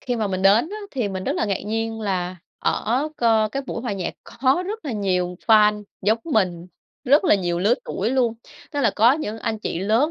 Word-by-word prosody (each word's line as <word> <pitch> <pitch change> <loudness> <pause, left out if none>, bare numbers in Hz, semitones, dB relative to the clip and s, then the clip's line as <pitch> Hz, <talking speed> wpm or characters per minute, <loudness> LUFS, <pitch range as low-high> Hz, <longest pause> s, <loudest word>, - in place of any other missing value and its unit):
Khi 245 -1 -2
mà 220 -2 0
mình 190 -1 -2
đến 210 - +5
á 420 - -5
thì 245 -7 -2
mình 190 -1 -5
rất - - 0
là - - +1
ngạc 200 -3 -1
nhiên, 225 +1 -2
là 185 -3 -2 0.2
ở 260 +7 0
co 225 -2 +3
cái 275 +6 -4
buổi 230 - -4
hòa 240 -5 -2
nhạc 185 -3 -4
có 265 +8 +1
rất 430 -1 -5
là 270 - -3
nhiều 180 -3 -1
fan 210 -2 +5 0.2
giống 220 +3 +2
mình, 185 - 0 0.4
rất 290 +7 +4
là - - +5
nhiều 175 -3 -1
lứa 210 +7 +3
tuổi 210 +5 -2
luôn. 250 -3 +1 0.4
Tức 290 - -1
là 230 -6 +3
có 230 +4 +6
những 225 -8 -3
anh 220 -1 -2
chị 170 - -3
lớn 225 - +2
220 Hz, 225 wpm, -22 LUFS, 195-250 Hz, 0.4 s, có